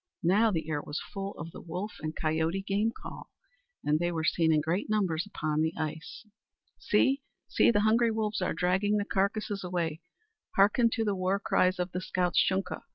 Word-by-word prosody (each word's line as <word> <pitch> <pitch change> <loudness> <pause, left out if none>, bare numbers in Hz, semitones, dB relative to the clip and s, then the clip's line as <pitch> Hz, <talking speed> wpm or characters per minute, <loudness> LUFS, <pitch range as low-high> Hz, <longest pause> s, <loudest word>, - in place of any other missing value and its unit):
Now 205 +7 +4
the 165 -6 -2
air 150 -2 -1
was 145 - -5
full 195 0 -6
of 165 - -7
the - - -10
wolf 180 +5 -5
and 155 0 -4
coyote 160 +4 0
game 205 +3 +1
call, - - -10 0.5
and 150 +1 +2
they 175 +1 0
were 160 -2 -2
seen 160 0 +2
in 155 - +4
great 165 +7 -1
numbers 190 -5 0
upon 155 -6 -1
the 160 +1 0
ice. 155 +7 -5 0.5
"See, 275 +1 +2 0.3
see! - - +4
the 205 -3 +3
hungry 230 +2 +4
wolves 220 -1 -1
are - - 0
dragging 190 +4 +1
the 205 - -1
carcasses 200 0 -1
away! 170 -3 -2 0.5
Harken 210 +4 +4
to 225 -2 0
the 205 - +1
war 190 +1 0
cries 185 -2 +2
of 180 0 -2
the 180 - -3
scout's 180 -2 +1
Shunka! 190 0 -1
185 Hz, 190 wpm, -29 LUFS, 160-205 Hz, 0.5 s, Now